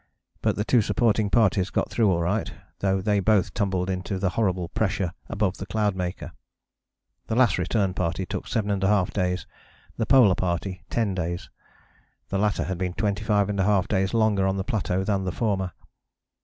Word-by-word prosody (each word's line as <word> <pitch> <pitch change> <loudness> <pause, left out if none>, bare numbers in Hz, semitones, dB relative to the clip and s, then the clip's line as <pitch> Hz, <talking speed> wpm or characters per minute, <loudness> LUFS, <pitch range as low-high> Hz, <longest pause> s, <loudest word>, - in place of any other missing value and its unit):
But - - +1
the 105 - -2
two 120 -1 +4
supporting 105 0 +1
parties 100 -4 +3
got - - -1
through 110 -4 +3
all 85 -2 +1
right, 100 +6 -1 0.3
though 95 -1 +1
they 105 +1 +1
both 100 -3 +2
tumbled 95 -3 -1
into 95 +1 -3
the 95 0 0
horrible 95 -6 0
pressure 100 -4 -1 0.2
above 100 -3 -1
the 95 - -7
Cloudmaker. 95 -5 -2 1.0
The 110 - -1
Last 120 -6 +3
Return 95 +1 0
Party 90 +1 -2
took - - -5
7½ 100 -3 +1
days: 90 -2 -1 0.5
the 115 - -1
Polar 125 -8 +6
Party 90 +1 -2
10 110 -4 0
days: 85 +1 -4 0.8
the 95 - -1
latter 105 0 +1
had 95 -2 -4
been 90 -1 -2
25½ 100 -2 +1
days 95 +2 +1
longer 105 -4 +3
on 95 0 0
the 95 - -1
plateau 95 -5 -1
than 100 -1 0
the 95 - -2
former. 95 -5 -1
95 Hz, 165 wpm, -25 LUFS, 95-105 Hz, 1.0 s, Polar